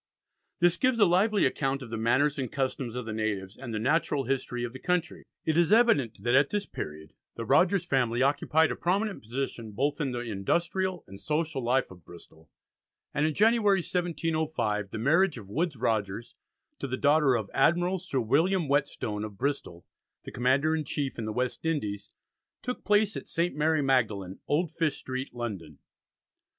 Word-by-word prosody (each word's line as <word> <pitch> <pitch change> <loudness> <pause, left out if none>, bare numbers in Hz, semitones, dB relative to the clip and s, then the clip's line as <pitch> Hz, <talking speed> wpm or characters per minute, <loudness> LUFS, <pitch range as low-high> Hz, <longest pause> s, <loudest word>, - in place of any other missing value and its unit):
This 175 0 +3
gives 255 +3 +2
a 210 - +6
lively 200 +4 +3
account 135 -1 -1
of 115 - -10
the - - -2
manners 140 +6 +2
and 130 -4 -3
customs 130 -3 -2
of 125 -2 -4
the 110 - -4
natives, 105 -3 -2
and 125 -2 -8
the 110 - -2
natural 145 +4 +1
history 125 -2 -2
of 120 0 -4
the 130 - -8
country. 180 -1 -1 0.2
It 160 - +1
is 170 -2 +3
evident 145 - +3
that 120 +1 +1
at 135 +1 +5
this 205 -1 -1
period 75 - -7 0.2
the 115 - -5
Rogers 180 - +3
family 125 -5 +1
occupied 155 +3 +2
a - - -2
prominent 195 +4 -1
position 115 -2 -5
both 140 +8 -1
in 135 -3 -1
the 120 -1 -3
industrial 170 - -1
and 95 0 -12
social 155 -2 -2
life 125 0 +1
of 90 -2 -14
Bristol, 80 -1 -15 0.6
and 150 +1 +2
in 155 - -2
January, 210 -3 +4
1705, 160 - -1
the 110 - -6
marriage 160 - +3
of 105 -4 -10
Woodes 160 +4 -1
Rogers 110 -2 -2 0.5
to 140 - -3
the 130 0 -3
daughter 145 -2 +4
of 110 -4 -3
Admiral 175 +6 +2
Sir 155 -7 -2
William 165 - +2
Whetstone, 135 -7 -1
of 105 -2 -7
Bristol, 125 -9 -3 0.4
the - - -8
Commander 135 +6 +2
in 155 - -1
Chief 140 -3 -3
in 115 - -3
the 110 - -3
West 125 +3 -2
Indies, 105 -12 -2 0.5
took 250 0 -4
place 210 0 +3
at - - -6
St. 170 +2 -1
Mary 155 0 +2
Magdalen, 105 -8 0
Old 155 +2 +1
Fish 165 -3 -1
Street, 130 +1 -5
London. 100 - -6
135 Hz, 180 wpm, -28 LUFS, 115-165 Hz, 0.6 s, a